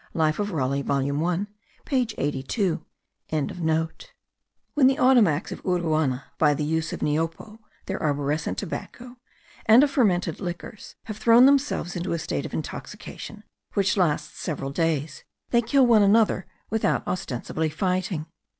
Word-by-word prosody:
Life 155 0 +1
of 205 0 -1
Raleigh 140 -5 -1
volume 140 +1 0
1 180 +4 0 0.4
page 255 -5 0
82.) 145 - -1 0.5
When 155 -3 0 1.4
the 265 +1 +3
Ottomacs 230 - +4
of - - -6
Uruana, 160 -7 0 0.2
by 150 -2 +4
the 150 - -2
use 160 +1 -1
of - - -6
niopo 165 +8 -2 0.3
(their 190 - -3
arborescent 145 0 -1
tobacco), 245 +6 -6 0.5
and 230 +5 +8
of 290 - +2
fermented 185 - +1
liquors, 180 +2 -7
have 215 -2 -7
thrown 230 +3 +6
themselves 275 -10 +2
into 175 0 -2
a - - 0
state 160 - -3
of - - -14
intoxication, - - -7 0.3
which 195 -2 +2
lasts 175 -7 0
several 140 -4 -3
days, 155 -2 -1 0.3
they 235 - +4
kill 260 +3 +3
one 230 -3 +5
another 205 -2 +3 0.2
without 220 0 +1
ostensibly 160 -3 -2
fighting. 180 0 -1
175 Hz, 140 wpm, -25 LUFS, 155-215 Hz, 1.4 s, and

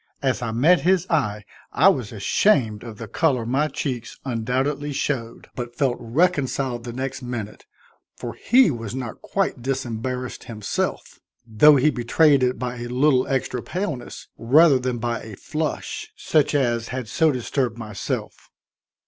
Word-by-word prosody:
As 130 -2 +1
I 115 -2 -2
met 150 +11 +4
his 185 -1 +2
eye 105 -10 0 0.3
I 155 +9 +4
was 130 - -1
ashamed 110 - +2
of 115 -3 -9
the 115 - -7
color 130 -1 +1
my 135 +6 +1
cheeks 125 -6 -4
undoubtedly 130 +4 -1
showed, 120 -5 -3
but 120 -1 -6
felt 130 -3 +1
reconciled 130 -2 0
the 120 - -5
next 130 +2 -4
minute, 120 -4 -6 0.5
for 120 -2 -6
he 235 - +4
was 115 -2 -5
not 125 -4 -6
quite 195 -10 -1
disembarrassed 125 -1 -3
himself, 110 -3 -3 0.3
though 120 +7 +6
he 145 +3 +4
betrayed 135 +3 +3
it 125 0 +1
by 125 0 -4
a 120 - -5
little 130 +1 +2
extra 130 -2 -1
paleness 175 - -5
rather 135 +4 +5
than 125 -1 -2
by 120 0 -2
a 110 -2 -9
flush, 155 +7 -4
such 150 -1 +1
as 120 -4 +1
had 130 -1 -5
so 160 +6 +2
disturbed 125 -2 -2
myself. 105 -4 -5
125 Hz, 150 wpm, -23 LUFS, 115-145 Hz, 0.5 s, though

